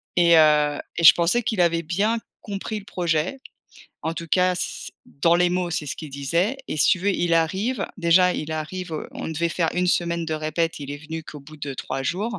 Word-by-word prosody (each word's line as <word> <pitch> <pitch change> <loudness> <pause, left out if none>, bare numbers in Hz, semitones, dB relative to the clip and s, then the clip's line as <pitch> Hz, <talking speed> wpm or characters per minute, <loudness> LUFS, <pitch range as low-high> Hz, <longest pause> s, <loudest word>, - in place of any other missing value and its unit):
et 170 -1 +5
heu, 150 -1 +4 0.2
et 170 - -2
je - - +11
pensais 180 +8 +1
qu'il 205 -5 0
avait 170 -1 +2
bien 205 +8 0 0.2
compris 205 +1 -5
le 200 - -15
projet 175 - -1 0.6
en 160 - -2
tout 170 - -6
cas 180 +2 +3
c 180 - -4
dans 165 +4 +1
les 175 0 +3
mots, 180 -1 -1
c'est 155 -2 -2
ce - - -4
qu'il 155 -3 -8
disait 170 - -1
et - - -3
si 145 - +4
tu - - +3
veux, 200 +2 +1
il 175 -3 +1
arrive, 190 +10 0
déjà 180 0 +4
il 160 +1 -4
arrive, 165 +3 -5
heu, 155 - -5
on - - -6
devait 165 +1 -1
faire 165 0 0
une 180 0 +1
semaine 170 -1 0
de 160 - -2
répètes, 155 +2 -2
il 140 -1 -7
est 145 - -5
venu 160 +2 -7
qu'au 150 - -10
bout 155 +2 -14
de 140 -2 -5
3 135 +1 -4
jours. 205 - -2
170 Hz, 230 wpm, -23 LUFS, 155-180 Hz, 0.6 s, je